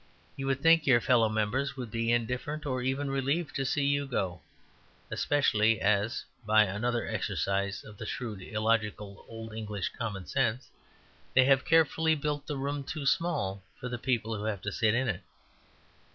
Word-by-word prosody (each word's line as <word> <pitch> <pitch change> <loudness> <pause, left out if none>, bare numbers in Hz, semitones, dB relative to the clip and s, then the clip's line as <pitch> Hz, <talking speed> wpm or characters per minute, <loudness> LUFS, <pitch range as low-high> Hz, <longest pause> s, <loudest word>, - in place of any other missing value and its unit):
You 135 -1 -4
would 135 0 0
think 165 -1 +5
your 125 -3 +6
fellow 115 -2 +3
members 125 +6 -1
would 125 -4 -5
be 115 +1 0
indifferent, 125 +6 -1
or 130 -3 -1
even 135 +2 -1
relieved 140 +4 -1
to 135 - -1
see 140 +1 +1
you 140 0 +1
go; 95 -9 -2 0.7
especially 115 -7 +2
as 105 +2 +1 0.2
(by 110 0 +5
another 115 +5 -1
exercise 100 0 -1
of 105 -2 -13
the 110 - -5
shrewd, 110 -6 -4
illogical 105 -1 -1
old 115 -1 -8
English 105 -3 -3
common 105 -6 -5
sense) 125 +1 -1 0.6
they 130 0 +7
have 135 -1 +4
carefully 160 0 +4
built 145 -1 -3
the 145 - -3
room 140 +1 -2
too 145 +1 -5
small 135 - 0 0.2
for 125 - -5
the 120 -1 -4
people 115 -3 0
who 105 +1 -4
have 105 -4 -2
to 105 - -2
sit 110 +2 +2
in 130 +2 +1
it. 100 -6 -1
120 Hz, 170 wpm, -30 LUFS, 105-140 Hz, 0.7 s, they